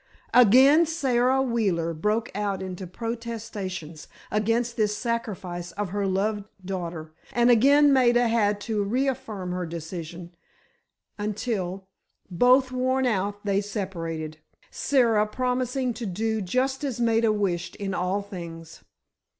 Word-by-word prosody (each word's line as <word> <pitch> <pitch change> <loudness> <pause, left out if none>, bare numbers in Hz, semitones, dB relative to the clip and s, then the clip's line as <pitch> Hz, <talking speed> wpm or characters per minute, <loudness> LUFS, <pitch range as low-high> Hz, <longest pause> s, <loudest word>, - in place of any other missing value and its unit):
Again 260 +7 +7
Sara 265 -4 +2
Wheeler 195 -10 0
broke 210 +8 -1
out 200 -2 -2
into 185 0 -6
protestations 215 -7 -6 0.2
against 230 +3 0
this 210 -1 0
sacrifice 190 -7 -4
of 205 +1 -3
her 200 +1 -1
loved 200 +2 0 0.2
daughter, 170 -4 -5 0.2
and 240 0 +4
again 280 +5 +6
Maida 240 -2 +4
had 210 -3 +2
to 215 -2 -1
reaffirm 220 -5 -2
her 180 -1 -3
decision, 170 +1 -7 0.9
until, 200 -3 -3 0.5
both 255 +7 +4
worn 260 +1 +1
out, 205 -2 -1
they 200 0 +2
separated, 165 -6 -5 0.3
Sara 230 -6 +2
promising 250 +2 -1
to 230 -1 -5
do 220 +4 -1
just 260 +8 -1
as 265 -5 -3
Maida 230 -1 +3
wished 185 -5 -1
in 200 -2 -4
all 185 +3 -1
things. 170 -5 -9
210 Hz, 120 wpm, -26 LUFS, 185-240 Hz, 0.9 s, Again